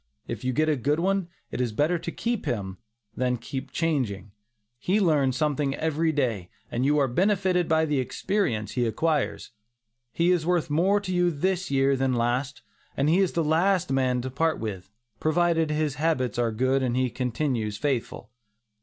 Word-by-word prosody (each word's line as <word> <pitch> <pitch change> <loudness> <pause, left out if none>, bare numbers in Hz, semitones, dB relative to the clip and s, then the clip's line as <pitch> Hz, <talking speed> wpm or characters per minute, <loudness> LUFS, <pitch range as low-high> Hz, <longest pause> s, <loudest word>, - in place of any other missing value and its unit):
If 115 -1 -5
you 130 - 0
get 155 +5 +1
a 155 - +3
good 145 +4 0
one, 195 0 0 0.2
it - - -2
is 120 -3 0
better 155 +10 +1
to 170 - -5
keep 235 +2 -3
him, 95 -5 -3 0.4
than 125 0 0
keep 135 +3 -6
changing. 125 - -1 0.5
He 190 +9 +1
learns 145 -9 +2
something 145 -2 0
every 160 +1 0
day, 115 - -1 0.2
and 120 - -1
you 145 +2 +3
are 140 -2 +3
benefited 185 +4 +1
by 160 0 +3
the 150 -3 0
experience 130 - -1
he 120 -2 0
acquires. 150 +6 -1 0.6
He 170 +6 +2
is 175 -3 +2
worth 170 -2 0
more 190 +7 +3
to 190 -2 -4
you 175 0 +3
this 185 +4 -1
year 135 0 +3
than 130 0 0
last, 125 +4 -1 0.3
and 140 +2 +2
he 170 +4 +4
is 190 -3 +2
the 165 - +1
last 175 +2 +2
man 130 -2 +1
to 130 +1 -5
part 160 +4 0
with, 95 -4 -5 0.3
provided 165 0 +2
his 150 -1 0
habits 130 -8 0
are 120 -1 +1
good 130 +4 +1
and 125 -1 0
he 130 -1 +1
continues 120 -3 -2
faithful. 125 -4 -3
145 Hz, 180 wpm, -26 LUFS, 125-165 Hz, 0.6 s, he